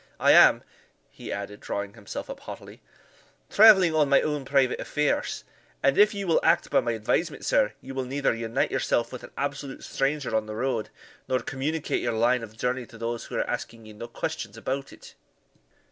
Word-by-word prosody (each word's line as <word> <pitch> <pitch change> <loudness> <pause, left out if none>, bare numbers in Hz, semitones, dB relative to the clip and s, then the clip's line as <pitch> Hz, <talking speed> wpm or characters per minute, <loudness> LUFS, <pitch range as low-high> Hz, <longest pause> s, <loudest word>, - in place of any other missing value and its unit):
I - - +5
am," - - +7 0.5
he - - -9
added, 100 +1 -5
drawing 100 0 -4
himself 105 -3 -7
up - - -8
haughtily, - - -10 0.7
"travelling 195 -6 +7
on 150 -3 +3
my 140 - +6
own 150 -3 -2
private 135 -2 +2
affairs, 150 -1 -1 0.4
and 140 0 +4
if 210 +1 +6
ye 200 -1 -3
will 165 -3 +3
act 165 +1 +2
by - - +5
my 120 -2 -1
advisement, 145 +9 -1
sir, 105 - +2
ye 135 - -9
will 130 -1 -3
neither 135 +1 0
unite 115 +2 -1
yourself 120 +1 0
with 125 - -7
an - - -10
absolute 140 -1 -4
stranger 135 -4 -1
on 110 -1 0
the 110 - -6
road, 120 -2 -2 0.4
nor 130 - +1
communicate 140 +6 -2
your 120 - -1
line 120 +2 +2
of 110 -1 -10
journey 125 +1 -2
to 115 - -14
those 115 +1 -4
who - - -8
are - - -1
asking 115 -1 -5
ye 110 - -11
no 110 +3 -8
questions 120 -4 -5
about 135 +4 -4
it." - - -14
130 Hz, 190 wpm, -26 LUFS, 115-145 Hz, 0.7 s, am